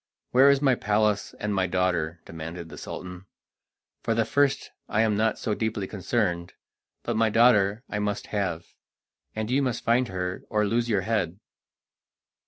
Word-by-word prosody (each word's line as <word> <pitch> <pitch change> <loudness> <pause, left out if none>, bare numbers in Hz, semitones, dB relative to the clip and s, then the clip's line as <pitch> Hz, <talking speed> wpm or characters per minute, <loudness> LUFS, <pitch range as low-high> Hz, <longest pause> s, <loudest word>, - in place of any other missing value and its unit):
"Where 135 +3 +7
is 140 0 +3
my 135 -2 +5
palace 105 -2 0
and 105 0 -2
my 95 -2 +1
daughter?" 90 -3 0
demanded 80 +1 -7
the - - -10
Sultan. 90 +1 -8 0.7
"For 115 - 0
the 115 0 +2
first 140 +3 +1 0.2
I 110 - +2
am 110 -2 +2
not 110 +1 +1
so 110 - -2
deeply 110 -2 -2
concerned, 90 -3 -1 0.5
but - - -2
my 110 0 +3
daughter 110 -1 +4
I 105 - -3
must 105 -1 -2
have, 90 -5 -1 0.7
and 110 +1 -3
you 135 +2 +3
must 130 -4 -1
find 120 +2 +3
her 90 -1 -3
or 105 -1 +1
lose 115 +3 0
your 105 -4 +2
head." 100 -4 -1
105 Hz, 165 wpm, -26 LUFS, 90-115 Hz, 0.7 s, Where